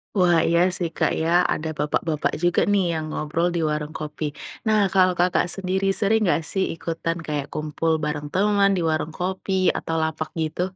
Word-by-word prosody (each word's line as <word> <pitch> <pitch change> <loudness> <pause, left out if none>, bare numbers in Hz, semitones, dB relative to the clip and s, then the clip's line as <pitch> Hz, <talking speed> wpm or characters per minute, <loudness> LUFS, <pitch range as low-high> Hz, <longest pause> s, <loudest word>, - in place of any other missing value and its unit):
Wah 175 -3 +4
iya 170 0 +3 0.2
sih 175 - -1
Kak - - +2
ya, 160 - 0 0.3
ada 160 +1 -4
bapak-bapak 150 +1 0
juga 175 0 +3
nih 200 -2 +3
yang 155 -1 -3
ngobrol 160 +3 -1
di - - +1
warung 150 0 -3
kopi. 155 0 -5 0.4
Nah 215 -1 +4
kalau 185 -1 +5
Kakak 180 0 +3
sendiri, 190 0 -1
sering 220 +1 +2
gak 165 - +1
sih 190 -1 +1
ikutan 165 0 -3
kayak 145 -2 -2
kumpul 155 +2 -1
bareng 150 0 -2
teman 200 0 +3
di - - 0
warung 155 0 -1
kopi 185 0 0
atau 165 - -3
lapak 155 0 -3
gitu? 155 +2 -2
165 Hz, 180 wpm, -23 LUFS, 155-190 Hz, 0.4 s, kalau